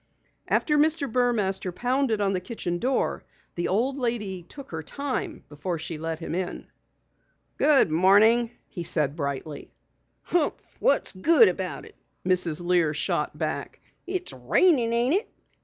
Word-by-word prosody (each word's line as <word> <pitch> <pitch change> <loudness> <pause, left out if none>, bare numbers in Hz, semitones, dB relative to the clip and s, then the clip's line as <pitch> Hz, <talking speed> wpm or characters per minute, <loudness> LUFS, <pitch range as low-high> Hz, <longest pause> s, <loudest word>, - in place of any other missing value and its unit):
After 300 -1 +2
Mr. 310 -1 +2
Burmaster 220 -7 0
pounded 245 +2 0
on 195 -1 +1
the 185 - 0
kitchen 180 -3 -4
door, 260 +5 0 0.3
the 175 - -2
old 255 +8 0
lady 215 -7 -2
took 270 - -12
her 160 -1 -4
time 280 - -4
before 160 +4 -4
she 160 0 -6
let 165 0 -3
him 165 - -6
in. 180 0 -3 0.9
"Good 280 - +4
morning," 210 +8 +5 0.2
he 175 - -7
said 150 -4 +1
brightly. 140 -1 -4 0.5
"Humph! 340 -4 -1
What's - - +2
good 235 - +5
about 185 0 -4
it?" - - -15 0.3
Mrs. 175 -2 +1
Lear 170 -4 +2
shot 150 - -1
back. - - -4 0.3
"It's 365 -1 -3
rainin', 275 -11 +3
ain't 240 +4 +2
it? 405 +6 0
200 Hz, 140 wpm, -26 LUFS, 175-260 Hz, 0.9 s, morning